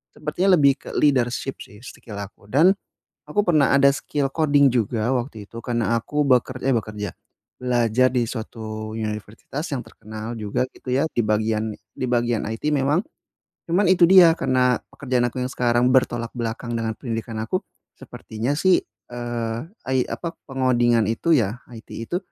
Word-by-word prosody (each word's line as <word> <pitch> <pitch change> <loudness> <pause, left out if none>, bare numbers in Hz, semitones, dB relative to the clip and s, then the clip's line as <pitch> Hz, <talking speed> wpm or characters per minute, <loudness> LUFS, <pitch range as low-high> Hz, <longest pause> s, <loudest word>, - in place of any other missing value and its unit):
sepertinya 180 +5 +2
lebih 140 -2 +5
ke - - -10
leadership 130 -2 +1
sih 105 - -16
skill 110 -3 -10
aku 100 0 -9
dan, 160 +8 +6 0.6
aku 205 - +1
pernah 155 -7 +3
ada 140 0 +6
skill 140 0 -2
coding 145 -3 +4
juga 115 -1 0
waktu 120 -4 -5
itu - - -13
karena 120 -2 0
aku 150 +6 -1
beker 130 0 +3
eh, 135 - +3
bekerja, 105 -1 -4 0.5
belajar 125 0 +2
di 125 -2 +1
suatu 110 -2 -6
universitas 110 +6 -5
yang 135 - -1
terkenal 110 0 -8
juga 105 +3 -1
gitu 125 - -6
ya 140 - +2
di - - 0
bagian 110 0 0 0.2
di - - -3
bagian 120 -2 +1
IT 110 +7 -3
memang, 145 +3 +2 0.7
cuman 185 +5 +3
itu 185 -2 +6
dia 180 -3 +8
karena 130 -2 +2 0.2
pekerjaan 130 -3 0
aku - - -8
yang 125 - -2
sekarang 120 0 +2
bertolak 120 -3 +2
belakang 115 +1 -3
dengan 110 -1 -2
pendidikan 115 -2 -4
aku, 115 +12 -1 0.4
sepertinya 110 +5 -5
sih, 185 +5 +3 0.3
eee, 120 -2 -3 0.3
ai 130 -1 +2
apa 170 -1 -5
pengodingan 120 -4 +2
itu 165 +9 +1
ya 115 -6 +2 0.2
IT 110 -1 -12
itu, 115 +10 -4
120 Hz, 160 wpm, -23 LUFS, 115-140 Hz, 0.7 s, dia